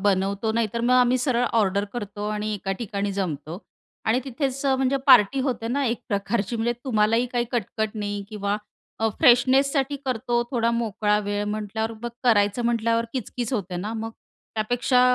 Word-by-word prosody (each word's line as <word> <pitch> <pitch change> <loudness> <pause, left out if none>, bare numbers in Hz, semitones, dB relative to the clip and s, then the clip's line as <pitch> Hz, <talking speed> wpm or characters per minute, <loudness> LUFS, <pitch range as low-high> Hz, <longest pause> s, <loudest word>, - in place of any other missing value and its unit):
बनवतो, 200 +2 +1
नाही 230 0 +1
तर 235 - 0
मग 245 +1 +2
आम्ही 250 0 +4
सरळ 245 -1 +1
ऑर्डर 200 -3 +2
करतो 205 -3 -4
आणि 215 0 -2
एका 195 -1 -3
ठिकाणी 205 -3 -2
जमतो 170 -3 -3 0.5
आणि 225 +3 +2
तिथेच 270 +1 -3
अ, 270 - +4
म्हणजे 265 +1 +1
पार्टी 245 +4 +6
होते 245 -4 -2
ना 275 +4 0
एक 235 0 -1
प्रकारची. 205 +1 -1
म्हणजे 230 +1 +1
तुम्हालाही 225 -1 +2
काही 240 -1 +1
कटकट 220 -1 -1
नाही 205 -1 -3
किंवा 205 -1 -2 0.4
अ, 225 - +2
फ्रेशनेससाठी 270 +1 +4
करतो. 240 -1 0
थोडा 235 -3 +1
मोकळा 215 -3 +1
वेळ 205 0 -1
म्हटल्यावर 220 +1 -3
मग 240 - -2 0.2
करायचं 205 -1 +3
म्हटल्यावर 230 0 +1
किचकिच 245 -1 -4
होते 195 -6 -2
ना 205 +5 -4
मग. 225 +1 -4 0.4
त्यापेक्षा 245 +3 +2
225 Hz, 165 wpm, -24 LUFS, 205-245 Hz, 0.5 s, पार्टी